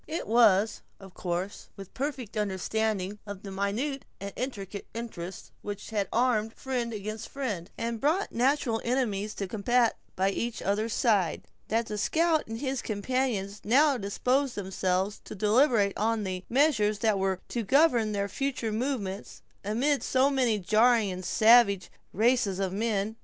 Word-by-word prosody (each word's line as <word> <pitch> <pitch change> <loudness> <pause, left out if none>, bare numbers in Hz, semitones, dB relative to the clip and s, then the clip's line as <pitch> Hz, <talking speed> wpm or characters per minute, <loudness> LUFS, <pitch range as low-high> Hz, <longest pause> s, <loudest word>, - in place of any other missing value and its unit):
It 320 +2 -3
was, 220 -2 +4 0.2
of 195 -2 -13
course, 180 +2 -4
with 195 -2 -10
a - - -40
perfect 265 -5 -4
understanding 210 0 -1
of 200 -2 -7
the 200 - -7
minute 215 +9 -2 0.2
and 200 0 -6
intricate 205 -6 -5
interests 195 -6 -7
which 205 +1 -6
had 205 -3 0
armed 225 -2 +1
friend 250 -3 -3
against 215 +1 -5
friend, 210 -11 -4
and 230 -1 -3
brought 330 +8 +1
natural 250 -2 +1
enemies 215 -5 -1
to 195 - -3
combat 230 +4 +1 0.2
by 190 +1 +2
each 235 +3 -3
other's 215 +3 -1
side, 205 -8 +2 0.2
that 225 +1 +1
the 210 -1 -4
scout 320 +7 +2
and 225 0 -5
his 265 -2 -1
companions 210 -2 -2
now 280 +5 +4
disposed 250 +5 0
themselves 190 0 -1
to - - -8
deliberate 210 0 +3
on 220 0 0
the 185 -1 -4
measures 235 -6 +3
that 210 -1 +1
were 190 -1 0
to 240 - -2
govern 240 -2 +3
their 200 -1 -1
future 255 -1 -2
movements, 215 -4 -3 0.2
amid 255 +8 +1
so 265 +2 +2
many 250 -5 +2
jarring 215 +2 +3
and 185 0 -6
savage 215 -3 +5 0.2
races 220 -3 +2
of 190 -1 -1
men. 215 0 -1
220 Hz, 155 wpm, -28 LUFS, 200-250 Hz, 0.2 s, savage